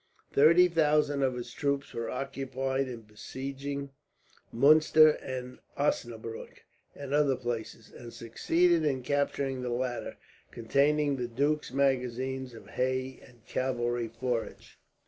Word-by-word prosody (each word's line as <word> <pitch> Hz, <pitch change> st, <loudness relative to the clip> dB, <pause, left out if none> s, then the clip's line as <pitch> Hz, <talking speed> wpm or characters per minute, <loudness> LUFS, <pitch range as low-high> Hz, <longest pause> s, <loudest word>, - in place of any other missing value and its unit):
Thirty 170 Hz, +5 st, +6 dB
thousand 150 Hz, -4 st, +2 dB
of 130 Hz, -2 st, +1 dB
his 120 Hz, -1 st, -7 dB
troops 140 Hz, -1 st, -2 dB
were 115 Hz, -, -3 dB
occupied 135 Hz, 0 st, -2 dB
in 120 Hz, -3 st, -7 dB
besieging 135 Hz, +6 st, -6 dB, 0.6 s
Muenster 155 Hz, +4 st, +6 dB
and 125 Hz, -1 st, -6 dB, 0.2 s
Osnabrueck, 115 Hz, -5 st, -3 dB, 0.3 s
and 140 Hz, -1 st, -6 dB
other 145 Hz, -2 st, +3 dB
places, 115 Hz, -2 st, -5 dB
and 120 Hz, -1 st, -10 dB
succeeded 165 Hz, +10 st, +1 dB
in 135 Hz, -4 st, 0 dB
capturing 140 Hz, -1 st, -1 dB
the 125 Hz, -, -3 dB
latter, 120 Hz, 0 st, -3 dB, 0.3 s
containing 140 Hz, +4 st, +1 dB
the 125 Hz, -1 st, -2 dB
duke's 145 Hz, +5 st, -1 dB
magazines 130 Hz, -1 st, -1 dB
of -, -, -13 dB
hay 130 Hz, +1 st, -2 dB
and 120 Hz, -2 st, -20 dB
cavalry 120 Hz, -2 st, -1 dB
forage. 115 Hz, +1 st, -4 dB
130 Hz, 120 wpm, -29 LUFS, 120-140 Hz, 0.6 s, Thirty